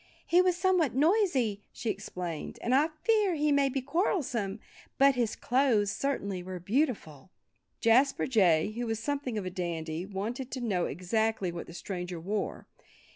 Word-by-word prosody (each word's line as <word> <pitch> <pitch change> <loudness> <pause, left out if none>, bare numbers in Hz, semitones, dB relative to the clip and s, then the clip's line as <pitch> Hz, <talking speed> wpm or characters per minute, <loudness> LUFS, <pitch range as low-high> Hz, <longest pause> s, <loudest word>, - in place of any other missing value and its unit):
"He 350 +1 +5
was 365 -1 +2
somewhat 360 -7 +2
noisy," 280 - +2
she 225 - -2
explained. 180 -5 -6
"And 240 - +1
I 285 +4 +5 0.2
fear 425 -6 +3
he 300 0 +1
may 280 -1 +3
be 270 0 -2
quarrelsome. 260 - -1 0.4
But 275 0 +6
his 240 -4 -1
clothes 240 -6 +2
certainly 200 -7 -2
were 185 0 -6
beautiful." 195 - -1 0.5
Jasper 255 +5 +4
Jay, 190 -8 +3
who 235 +2 -4
was 225 -1 -2
something 275 -2 -2
of 200 - -3
a 185 - -3
dandy, 170 -1 -4
wanted 225 +7 -4
to 260 - -3
know 200 -8 0
exactly 200 +3 -1
what 170 0 -7
the 170 - -10
stranger 180 -1 -5
wore. 200 +5 -3
225 Hz, 160 wpm, -29 LUFS, 185-275 Hz, 0.5 s, But